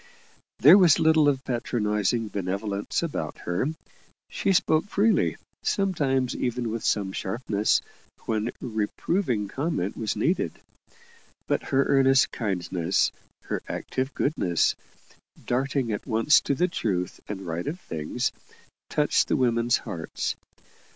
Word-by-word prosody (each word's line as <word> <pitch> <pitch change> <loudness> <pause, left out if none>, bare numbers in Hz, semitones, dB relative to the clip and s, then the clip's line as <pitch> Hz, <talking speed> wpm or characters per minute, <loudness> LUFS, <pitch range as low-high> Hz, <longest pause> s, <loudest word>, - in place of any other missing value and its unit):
There 160 - +8
was 175 -6 +6
little 160 -2 +4
of 135 -2 -1
patronizing 110 -2 0
benevolence 100 - -2
about 80 - -3
her; 90 +9 0 0.6
she - - 0
spoke 160 -3 +3
freely, 205 +2 +2 0.2
sometimes 145 -10 0
even 120 -2 -2
with 115 0 -4
some 100 -3 +1
sharpness, 105 +1 0 0.4
when 110 +1 -1
reproving 115 - -1
comment 130 - -2
was 110 -2 -2
needed; - - 0 0.9
but - - 0
her 135 +1 +2
earnest 135 -1 +4
kindness, 90 -4 0 0.3
her - - -3
active 130 +2 -3
goodness, 90 - +1 0.7
darting 130 -1 0
at 105 - -4
once 115 +5 +4
to 140 - -1
the 180 +7 +2
truth 95 - -2
and 95 -2 -6
right 85 +1 -4
of 165 +5 -3
things, 75 - -3 0.6
touched - - +2
the - - +1
women's 120 -1 +2
hearts. 80 -2 -4
120 Hz, 120 wpm, -26 LUFS, 100-140 Hz, 0.9 s, There